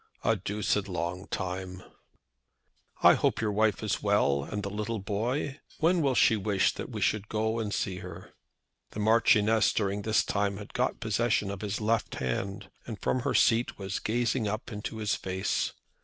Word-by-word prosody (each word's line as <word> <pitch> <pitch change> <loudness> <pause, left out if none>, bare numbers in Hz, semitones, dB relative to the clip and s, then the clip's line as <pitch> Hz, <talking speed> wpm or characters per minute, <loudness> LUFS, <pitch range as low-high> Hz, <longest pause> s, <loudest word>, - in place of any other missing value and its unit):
"A - - +3
deuced 105 0 -1
long 90 +1 -3
time." 95 -1 -4 1.2
"I - - +9
hope - - +1
your 110 -1 0
wife 105 -2 +1
is - - -1
well; 70 0 +2
and 105 +7 -4
the 100 - -3
little 105 +2 -3
boy. 120 +8 -2 0.2
When 170 +2 +3
will 135 -4 +2
she 115 - +5
wish 100 -2 +1
that - - -6
we - - -5
should 105 -1 0
go 110 +1 0
and 105 -2 -2
see 95 -2 -2
her?" 90 0 -10 0.6
The - - -5
Marchioness 110 0 +4
during 100 -1 0
this 110 +1 +2
time 100 -1 -1
had 105 0 -10
got - - 0
possession 110 -2 +1
of 100 - -6
his 105 -1 -2
left 110 0 0
hand, 95 - -3 0.2
and 110 -4 -6
from 130 - 0
her - - -1
seat 115 +1 +3
was 95 -1 -3
gazing 120 0 0
up 110 +4 -4
into 105 +1 -5
his 105 -2 0
face. 95 0 -1
105 Hz, 175 wpm, -29 LUFS, 95-110 Hz, 1.2 s, I